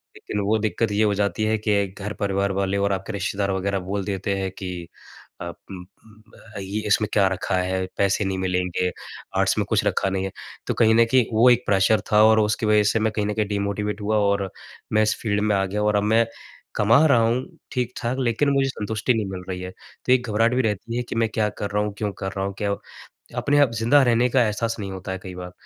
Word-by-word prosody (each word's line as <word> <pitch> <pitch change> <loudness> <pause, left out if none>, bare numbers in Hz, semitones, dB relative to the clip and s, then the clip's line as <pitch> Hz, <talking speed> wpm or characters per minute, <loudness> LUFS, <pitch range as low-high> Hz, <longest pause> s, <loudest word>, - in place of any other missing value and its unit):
लेकिन 105 - -5
वो 110 +2 +2
दिक़्क़त 110 0 -1
ये 105 +2 +2
हो 105 -1 +2
जाती 100 +2 0
है 110 0 +1
कि 100 -2 +1
घर-परिवार 100 0 -2
वाले 100 +1 0
और 100 0 +1
आपके 95 +3 -4
रिश्तेदार 100 0 -1
वग़ैरह 95 +1 -1
बोल 100 -1 -2
देते 100 0 -2
हैं 95 0 -2
कि 95 -2 -4 0.7
अ, - - -4 0.3
उम, 90 -2 -7
उ 110 +4 -21 0.2
अ, - - -4
ये 100 +3 -4
इसमें 105 +1 +2
क्या 100 -2 +4
रखा 95 +1 -1
है, 95 0 -1
पैसे 100 +1 +1
नहीं 95 0 -2
मिलेंगे, 90 -1 -1 0.5
आर्ट्स - - +2
में - - 0
कुछ - - +2
रखा 95 - +1
नहीं 95 0 -2
है। 95 - -4 0.4
तो - - 0
कहीं 110 -1 +4
न 115 - +6
कहीं 130 -3 +4
वो 115 +3 +6
एक 120 0 +4
प्रेशर 100 +2 +3
था 105 0 +6
और 110 0 +5
उसकी 110 +1 +1
वज़ह 105 0 +4
से 110 - +1
मैं 110 0 +1
कहीं 105 - 0
न 105 - -1
कहीं 110 -1 0
डिमोटिवेट 100 +1 -2
हुआ 105 +1 +1 0.2
और 100 -1 -2 0.4
मैं 110 - +4
इस 110 0 +1
फ़ील्ड 105 -2 0
में 105 -1 +2
आ 95 - +1
गया 105 +2 -2
और 105 0 +2
अब 100 - +1
मैं 110 +2 +3 0.5
कमा 115 +9 +5
रहा 130 -5 +5
हूँ 115 +3 +1 0.3
ठीक-ठाक, 125 -1 -2
लेकिन 125 +3 +1
मुझे 135 -1 +2
संतुष्टि 110 +1 -1
नहीं 110 -3 -1
मिल 90 -1 -6
रही 90 -1 -4
है। 90 0 -6
तो 125 - -7
एक 125 -1 +1
घबराहट 115 +3 +2
भी 130 - +3
रहती 110 +2 -2
है 125 - -1
कि - - -4
मैं 115 0 +2
क्या 110 -1 0
कर 100 - -2
रहा 105 +1 +1
हूँ, 105 -1 -3
क्यों 105 -1 -2
कर 95 0 -5
रहा 95 0 -3
हूँ। 100 - -3
क्यों 100 -1 -1 0.6
अपने 145 0 +2
आप 140 -5 +4
ज़िंदा 135 +6 +5
रहने 120 0 +3
का 125 -1 +3
एहसास 115 +2 -1
नहीं 100 -1 -5
होता 95 0 -6
है 95 - -3
कई 95 -1 -8
बार। 90 0 -7
105 Hz, 240 wpm, -23 LUFS, 95-110 Hz, 0.7 s, न